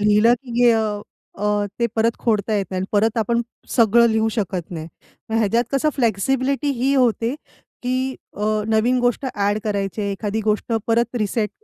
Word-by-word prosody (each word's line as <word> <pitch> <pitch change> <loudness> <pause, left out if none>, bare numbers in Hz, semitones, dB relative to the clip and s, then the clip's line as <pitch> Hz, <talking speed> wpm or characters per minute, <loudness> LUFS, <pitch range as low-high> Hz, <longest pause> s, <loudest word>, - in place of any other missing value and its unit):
लिहिलं 210 +3 +5
की 250 - -11
गे 240 -1 +6
अ, 225 - +2 0.6
अ, 205 0 +1
ते 235 - +2
परत 230 +1 +2
खोडता 215 -2 0
येत 195 - -1
नाही 185 - -2
आणि 190 - -2
परत 220 +3 +2
आपण 235 +2 +1 0.3
सगळं 235 0 +4
लिहू 220 0 +1
शकत 185 -4 -3
नाही. 160 -2 -6 0.4
मग 225 - 0
ह्याच्यात 230 +2 +2
कसं 275 +3 +2
फ्लेक्सिबिलिटी 265 +5 0
ही 275 +2 +2
होते, 240 -1 +2 0.5
की 255 +1 -1 0.2
अ, 215 +1 0
नवीन 230 +3 +2
गोष्ट 245 +2 0
ॲड 205 +1 +1
करायचे 200 0 -2
आहे, 200 - -1
एखादी 210 +2 -2
गोष्ट 215 +2 0
परत 235 +1 +1
रिसेट 210 0 -1
220 Hz, 175 wpm, -21 LUFS, 205-240 Hz, 0.6 s, गे